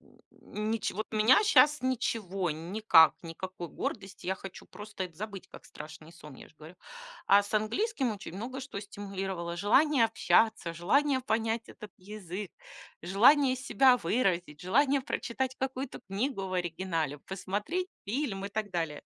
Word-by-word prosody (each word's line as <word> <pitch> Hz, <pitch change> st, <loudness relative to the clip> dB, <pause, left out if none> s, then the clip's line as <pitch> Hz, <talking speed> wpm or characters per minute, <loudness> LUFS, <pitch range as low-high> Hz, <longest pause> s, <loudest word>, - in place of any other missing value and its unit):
Н -, -, -24 dB, 0.2 s
н -, -, -16 dB
н 210 Hz, +1 st, -1 dB
ничё 225 Hz, -2 st, -1 dB
вот 215 Hz, +1 st, -5 dB
меня 220 Hz, -, +5 dB
сейчас 300 Hz, -8 st, +5 dB
ничего, 210 Hz, -8 st, -1 dB
никак, 165 Hz, 0 st, +4 dB
никакой 175 Hz, +1 st, -7 dB
гордости. 195 Hz, 0 st, -6 dB
Я 190 Hz, -, +1 dB
хочу 190 Hz, -1 st, -10 dB
просто 210 Hz, -2 st, -7 dB
это 175 Hz, -3 st, -11 dB
забыть, 195 Hz, -1 st, -7 dB
как -, -, -13 dB
страшный 155 Hz, +2 st, -11 dB
сон, 150 Hz, -4 st, -13 dB
я -, -, -13 dB
же -, -, -25 dB
говорю. 160 Hz, +3 st, -12 dB, 0.5 s
А 200 Hz, +1 st, +6 dB
с 200 Hz, -, -10 dB
английским 245 Hz, -, 0 dB
очень 200 Hz, -4 st, -9 dB
много 255 Hz, +5 st, -5 dB
что 255 Hz, -6 st, -6 dB
стимулировало: 195 Hz, -4 st, -5 dB
желание 255 Hz, -, +4 dB
общаться, 220 Hz, -5 st, +2 dB
желание 260 Hz, -, +2 dB
понять 225 Hz, -1 st, -1 dB
этот 210 Hz, -, -11 dB
язык, 195 Hz, -1 st, -7 dB, 0.5 s
желание 255 Hz, -, +5 dB
себя 255 Hz, 0 st, +4 dB
выразить, 175 Hz, -, -1 dB
желание 275 Hz, +9 st, +2 dB
прочитать 260 Hz, 0 st, -3 dB
какую-то 265 Hz, 0 st, -4 dB
книгу 200 Hz, +1 st, -2 dB
в -, -, -7 dB
оригинале, 170 Hz, -4 st, -2 dB
посмотреть 205 Hz, -, -3 dB, 0.2 s
фильм 210 Hz, -3 st, -2 dB
и 200 Hz, -, -3 dB
так 210 Hz, 0 st, -3 dB
далее. 165 Hz, -4 st, -3 dB
205 Hz, 155 wpm, -30 LUFS, 180-250 Hz, 0.5 s, А